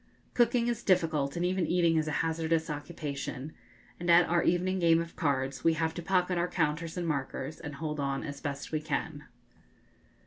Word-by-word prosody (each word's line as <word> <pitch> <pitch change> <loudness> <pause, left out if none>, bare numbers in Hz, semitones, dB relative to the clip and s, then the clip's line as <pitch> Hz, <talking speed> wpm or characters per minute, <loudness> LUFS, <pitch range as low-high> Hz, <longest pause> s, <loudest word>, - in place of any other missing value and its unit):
Cooking 240 0 +3
is 235 -1 -1
difficult, 160 -8 +1
and 175 +1 0
even 180 -2 0
eating 170 -2 +3
is 155 -1 +1
a - - -1
hazardous 160 0 0
occupation; 145 -2 -5 0.5
and 175 0 -3
at 170 0 +7
our 170 +1 +2
evening 185 +2 +1
game 165 -1 +5
of 170 0 -5
cards 135 -4 -1
we 165 - +4
have 160 0 -1
to 175 - -5
pocket 180 0 +1
our 175 - +1
counters 165 0 -1
and 175 -1 -2
markers 140 0 -3
and 150 -2 -7
hold 150 0 -4
on 140 -1 -1
as 140 -1 -6
best 140 -2 -4
we 155 -1 -1
can. 155 -1 -3
160 Hz, 185 wpm, -30 LUFS, 150-175 Hz, 0.5 s, at